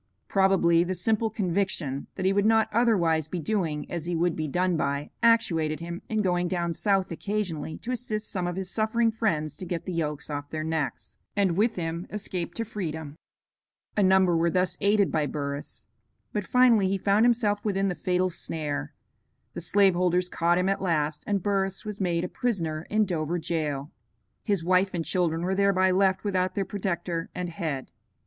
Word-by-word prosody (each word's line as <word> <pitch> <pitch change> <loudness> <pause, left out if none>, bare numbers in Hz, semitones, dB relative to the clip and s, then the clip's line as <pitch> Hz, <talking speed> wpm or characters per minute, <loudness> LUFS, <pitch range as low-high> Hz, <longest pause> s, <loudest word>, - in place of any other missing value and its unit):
Probably 190 -4 +4
the 185 +1 -2
simple 220 +5 +1
conviction 180 -9 -1
that 185 - -3
he 190 - +4
would 200 +1 +3
not 220 0 +4
otherwise 175 -10 +2
be 175 +2 -4
doing 165 -4 -1
as 170 -2 -3
he 175 0 -1
would 170 0 +1
be 155 -1 -2
done 180 +4 +1
by 140 -1 -1
actuated 165 -10 +3
him 170 +1 -6
in 215 -1 +1
going 175 -1 +1
down 170 -2 -1
South 195 +1 +1
occasionally 170 -4 -3
to 245 - -6
assist 220 -4 -3
some 180 -3 -2
of 175 - -3
his 190 0 -4
suffering 225 +1 +2
friends 160 -10 -1
to 185 - -6
get 170 -1 -3
the 185 - -4
yokes 150 -3 -2
off 145 0 -4
their 155 -1 -3
necks, 160 -3 -3 0.2
and 195 -4 +2
with 220 +4 +2
him 170 +1 -3
escape 190 -4 -4
to 230 - -2
freedom. 160 -8 -5 0.8
A 210 - +2
number 190 -2 +4
were 165 +1 +3
thus 180 +1 +1
aided 200 -1 +3
by 150 -2 +1
Burris. 140 +1 -5 0.5
But 205 -3 -2
finally 240 -6 +5
he 195 +1 +1
found 200 +3 +3
himself 225 -4 +2
within 195 -2 +1
the 185 - 0
fatal 180 +1 0
snare; 155 -3 -4 0.6
the - - -5
slave 200 -2 +4
holders 180 0 +1
caught 170 0 +2
him 180 +1 +1
at 195 0 0
last, 155 -5 0
and 200 -3 0
Burris 195 0 -1
was 210 -1 -5
made 170 -2 +1
a - - -1
prisoner 165 -9 -2
in 215 0 +3
Dover 170 -2 -1
jail. 150 -4 -2 0.5
His 200 -6 0
wife 185 +2 +2
and 165 -2 -2
children 170 -3 0
were 185 +2 0
thereby 190 -1 +3
left 190 0 +2
without 185 -2 0
their 195 - 0
protector 180 -3 -3
and 180 -1 -3
head. 155 -5 -4
180 Hz, 185 wpm, -27 LUFS, 165-200 Hz, 0.8 s, finally